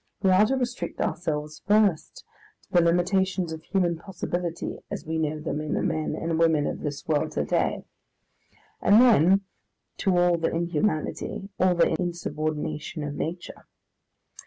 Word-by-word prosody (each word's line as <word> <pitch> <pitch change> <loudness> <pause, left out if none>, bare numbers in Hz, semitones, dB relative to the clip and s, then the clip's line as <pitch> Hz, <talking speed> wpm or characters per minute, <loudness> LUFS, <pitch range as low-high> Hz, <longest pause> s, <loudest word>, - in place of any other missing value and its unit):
We 190 - +4
are 195 +3 +5
to 265 - +1
restrict 245 -9 -3
ourselves 155 -3 -2
first 205 -5 +2 0.4
to - - -28
the 175 - +6
limitations 180 +1 +1
of 160 - -7
human 175 -1 0
possibility 175 -2 -4
as - - -5
we 160 +1 -2
know 155 -1 -1
them 150 -1 -3
in 155 - -2
the - - -1
men 155 -2 -1
and 165 -1 -2
women 160 -3 +3
of - - -3
this 145 -1 -5
world 150 -2 0
to - - -1
day, - - 0 1.0
and 205 +3 +6
then 195 - +5 0.6
to 190 -2 +1
all 175 -1 +3
the 165 - +1
inhumanity, 170 +3 -2
all 185 -1 +3
the 170 -1 +3
insubordination 155 -2 -3
of 145 -1 -4
nature. 165 +4 -6
170 Hz, 155 wpm, -26 LUFS, 155-185 Hz, 1.0 s, the